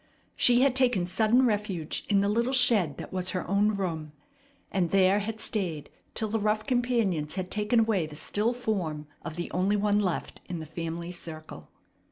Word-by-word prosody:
She 245 Hz, 0 st, +5 dB
had 270 Hz, -1 st, +3 dB
taken 245 Hz, -9 st, +2 dB
sudden 220 Hz, +7 st, +3 dB
refuge 205 Hz, -8 st, -2 dB
in 200 Hz, -2 st, +3 dB
the 200 Hz, -, +1 dB
little 235 Hz, +5 st, 0 dB
shed 225 Hz, -, +5 dB
that -, -, -8 dB
was 185 Hz, 0 st, -1 dB
her 185 Hz, -, -3 dB
own 205 Hz, +3 st, +2 dB
room, 160 Hz, -6 st, -4 dB, 0.6 s
and 180 Hz, -3 st, 0 dB
there 195 Hz, +1 st, +4 dB
had 220 Hz, +2 st, -4 dB
stayed 175 Hz, -11 st, -2 dB, 0.2 s
till 220 Hz, -, 0 dB
the 225 Hz, +1 st, -1 dB
rough 215 Hz, +1 st, 0 dB
companions 235 Hz, -, 0 dB
had 185 Hz, -1 st, -4 dB
taken 210 Hz, +3 st, +1 dB
away 210 Hz, -8 st, +1 dB
the 150 Hz, -, -11 dB
still 210 Hz, +9 st, 0 dB
form 195 Hz, -11 st, -3 dB, 0.2 s
of 160 Hz, -2 st, -6 dB
the 175 Hz, 0 st, -5 dB
only 190 Hz, +3 st, +1 dB
one 205 Hz, 0 st, +2 dB
left 185 Hz, -5 st, -3 dB
in 180 Hz, -, -3 dB
the 160 Hz, -, -6 dB
family 165 Hz, +2 st, -5 dB
circle. 155 Hz, -, -9 dB
200 Hz, 185 wpm, -27 LUFS, 170-220 Hz, 0.6 s, She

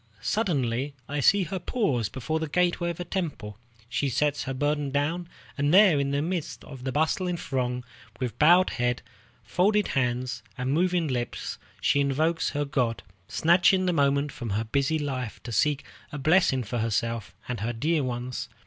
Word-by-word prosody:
Suddenly 140 Hz, -, 0 dB
I 145 Hz, +1 st, -2 dB
see 195 Hz, +8 st, +4 dB
her 185 Hz, +3 st, -4 dB
pause 140 Hz, -, 0 dB
before 155 Hz, +8 st, -2 dB
the 160 Hz, -1 st, -3 dB
gateway 175 Hz, +1 st, +1 dB
of 170 Hz, -, -5 dB
a -, -, -2 dB
temple. 140 Hz, -, -4 dB, 0.3 s
She 135 Hz, +2 st, -1 dB
sets 145 Hz, +3 st, 0 dB
her 135 Hz, -, -3 dB
burden 145 Hz, +1 st, 0 dB
down, 160 Hz, +5 st, -1 dB, 0.3 s
and 145 Hz, +1 st, +2 dB
there 185 Hz, -5 st, +7 dB
in 140 Hz, 0 st, 0 dB
the 140 Hz, +1 st, 0 dB
midst 175 Hz, -1 st, -3 dB
of 135 Hz, -3 st, -10 dB
the 130 Hz, -, -1 dB
bustling 170 Hz, +5 st, 0 dB
throng, 125 Hz, -4 st, -2 dB, 0.4 s
with 125 Hz, -3 st, -3 dB
bowed 175 Hz, +4 st, +6 dB
head, 120 Hz, 0 st, -1 dB, 0.4 s
folded 205 Hz, +3 st, +2 dB
hands, 125 Hz, -1 st, -1 dB, 0.2 s
and 130 Hz, +2 st, -1 dB
moving 175 Hz, 0 st, +2 dB
lips, 125 Hz, -3 st, -3 dB, 0.2 s
she 145 Hz, -, +3 dB
invokes 155 Hz, +4 st, +1 dB
her 145 Hz, 0 st, -1 dB
god, 120 Hz, -7 st, -1 dB, 0.2 s
snatching 180 Hz, +3 st, +4 dB
this 180 Hz, -, +2 dB
moment 140 Hz, -1 st, +2 dB
from 120 Hz, -4 st, -6 dB
her 110 Hz, -, 0 dB
busy 140 Hz, +7 st, 0 dB
life 130 Hz, -6 st, -3 dB
to 120 Hz, -, -6 dB
seek 145 Hz, +4 st, +1 dB, 0.3 s
a 145 Hz, -, -5 dB
blessing 150 Hz, -3 st, +3 dB
for 120 Hz, +2 st, -3 dB
herself 115 Hz, 0 st, -1 dB
and 125 Hz, -3 st, -3 dB
her 110 Hz, +4 st, -1 dB
dear 150 Hz, +6 st, 0 dB
ones. 125 Hz, 0 st, -4 dB
140 Hz, 175 wpm, -27 LUFS, 125-165 Hz, 0.4 s, there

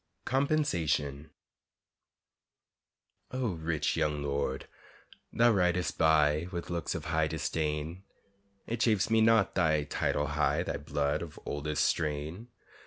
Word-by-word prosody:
COMPENSATION 85 Hz, -, 0 dB, 2.0 s
O, 130 Hz, -2 st, -1 dB
rich 80 Hz, -1 st, -1 dB
young 75 Hz, -1 st, 0 dB
lord, 70 Hz, -1 st, -2 dB, 0.6 s
thou 120 Hz, +1 st, +4 dB
ridest 90 Hz, -3 st, +1 dB
by 80 Hz, 0 st, +3 dB
With 85 Hz, -1 st, -5 dB
looks 85 Hz, -1 st, -2 dB
of -, -, -5 dB
high -, -, +1 dB
disdain; 80 Hz, +3 st, -2 dB, 0.6 s
It 115 Hz, 0 st, -3 dB
chafes 110 Hz, -3 st, +2 dB
me 115 Hz, 0 st, +4 dB
not 110 Hz, -2 st, +4 dB
thy 80 Hz, -4 st, +2 dB
title 75 Hz, 0 st, -1 dB
high, 75 Hz, +1 st, +1 dB
Thy -, -, -3 dB
blood 75 Hz, 0 st, -1 dB
of 85 Hz, -3 st, -8 dB
oldest 75 Hz, +1 st, -1 dB
strain. 80 Hz, +7 st, -2 dB
80 Hz, 115 wpm, -30 LUFS, 75-100 Hz, 2.0 s, thou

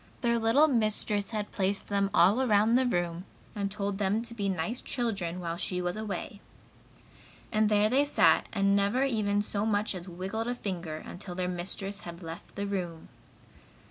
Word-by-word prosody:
Their 235 Hz, -1 st, +2 dB
little 230 Hz, +8 st, +5 dB
mistress 215 Hz, -5 st, +1 dB
had 210 Hz, -2 st, -3 dB
placed 195 Hz, 0 st, 0 dB
them 200 Hz, -1 st, +1 dB
all 195 Hz, +9 st, +5 dB
around 220 Hz, -2 st, +3 dB
the 255 Hz, +1 st, +4 dB
room 175 Hz, -4 st, -1 dB, 0.3 s
and 200 Hz, -2 st, -2 dB
told 200 Hz, -1 st, -3 dB
them 205 Hz, +3 st, +1 dB
to 235 Hz, 0 st, -5 dB
be 200 Hz, -3 st, -2 dB
nice 190 Hz, +7 st, -2 dB
children 195 Hz, -8 st, -2 dB
while 170 Hz, -1 st, -3 dB
she 180 Hz, +1 st, -2 dB
was 180 Hz, 0 st, -1 dB
away. 210 Hz, -1 st, -5 dB, 1.1 s
And 215 Hz, -1 st, +3 dB
there 210 Hz, 0 st, +4 dB
they 260 Hz, +6 st, +3 dB
sat 290 Hz, -, +4 dB
and 200 Hz, 0 st, +2 dB
never 200 Hz, +6 st, +2 dB
even 210 Hz, -6 st, +1 dB
so 205 Hz, 0 st, -1 dB
much 215 Hz, -1 st, +1 dB
as 185 Hz, 0 st, -7 dB
wiggled 190 Hz, +6 st, -4 dB
a 245 Hz, -, -1 dB
finger, 175 Hz, -8 st, -4 dB
until 180 Hz, -1 st, -7 dB
their 180 Hz, 0 st, -1 dB
mistress 195 Hz, +3 st, -3 dB
had 170 Hz, -1 st, -9 dB
left 165 Hz, 0 st, -9 dB
the 200 Hz, -, -2 dB
room. 180 Hz, -5 st, -4 dB
200 Hz, 175 wpm, -29 LUFS, 185-220 Hz, 1.1 s, little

